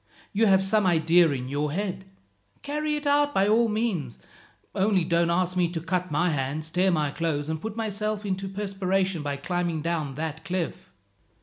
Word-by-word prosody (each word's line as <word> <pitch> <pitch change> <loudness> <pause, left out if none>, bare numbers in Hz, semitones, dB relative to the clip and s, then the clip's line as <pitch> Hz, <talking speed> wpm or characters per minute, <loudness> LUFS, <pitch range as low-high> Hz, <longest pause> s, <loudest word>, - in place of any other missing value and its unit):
You 220 +2 +3
have 190 -1 +5
some 195 0 +2
idea 165 0 +4
in 130 -3 -3
your 145 +2 -1
head. 190 0 -3 0.6
Carry 300 +1 -1
it 295 0 -5
out 290 0 +2
by 195 +1 +3
all 225 +2 +4
means; 210 - -1 0.6
only 195 -2 +2
don't 170 0 +2
ask 180 +1 +1
me 180 -2 +2
to 170 -1 -3
cut 180 +2 -2
my 160 +4 +1
hands, 150 +3 -2
tear 185 +2 +3
my 155 -5 +1
clothes, 155 -2 -2
and 160 -1 -3
put 220 -1 -5
myself 215 -1 -2
into 195 0 -2
a - - -6
perspiration 195 -3 -1
by 145 -1 -3
climbing 170 +1 -2
down 160 -5 -2
that 160 +1 -4
cliff." 185 -3 -4
180 Hz, 185 wpm, -26 LUFS, 160-200 Hz, 0.6 s, have